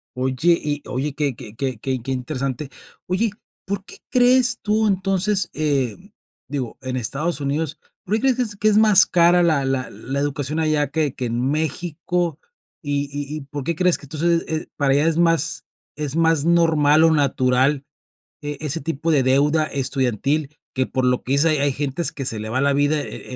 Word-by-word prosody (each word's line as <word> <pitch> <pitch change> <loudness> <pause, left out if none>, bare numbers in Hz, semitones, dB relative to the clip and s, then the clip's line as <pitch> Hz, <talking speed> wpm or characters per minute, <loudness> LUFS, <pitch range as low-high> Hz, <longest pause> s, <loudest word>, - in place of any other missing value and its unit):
Oye 130 +7 +2
y 145 -1 -2
oye 135 +3 -2
que 140 -3 -1
que 115 -4 -11
que 130 -1 -3
que 130 +1 -3
interesante. 130 +1 -3 0.4
Oye, 195 +5 0 0.3
¿por 200 0 -3
qué - - -12
crees 250 0 +4
tú 215 +1 +1
entonces? 195 0 0
Eh 140 -6 0 0.5
digo, 135 -4 -4
en 130 -1 -4
Estados 145 +7 -2
Unidos, 145 +2 -2 0.3
¿por 205 - 0
qué 220 - -1
crees 265 -2 +2
que - - +1
es 210 -3 -6
que 210 +2 0
es 210 - +3
más 215 -3 +7
cara 175 0 +4
la 155 -5 +2
la 135 -1 -1
la 135 +2 -5
educación 145 +1 -2
allá 155 -3 +1
que 150 -2 -1
que 125 - -4
en 120 +2 -1
México? 165 +2 -2 0.4
Y 145 -1 -2
y 145 +1 -5
y, - - -6
¿por 140 0 -7
qué 170 +5 -1
crees 180 +1 +3
que - - -13
entonces 165 +4 0
es 160 0 -3
para 140 -2 +2
allá 145 +3 +3
es 165 -1 +1
más 165 -1 +1 0.3
es 150 -1 -4
más 165 -2 +2
normal 160 -3 +4
o 165 - +5
natural 135 -1 +2 0.6
e 145 -1 -5
ese 155 +1 -2
tipo 165 +2 -2
de 140 -4 +3
deuda 145 +4 +3
estudiantil 140 +2 -1 0.2
que 130 -1 0
por 130 0 -1
lo 125 0 +1
que 130 - -2
dice 145 +4 +4
hay 155 - +2
hay 140 0 +2
gentes 145 +4 -2
que 135 - -6
se 110 -3 0
le 110 +1 -5
va 130 +4 0
la 140 0 +3
vida 145 +2 +2
eh 130 - -8
145 Hz, 195 wpm, -21 LUFS, 135-165 Hz, 0.6 s, más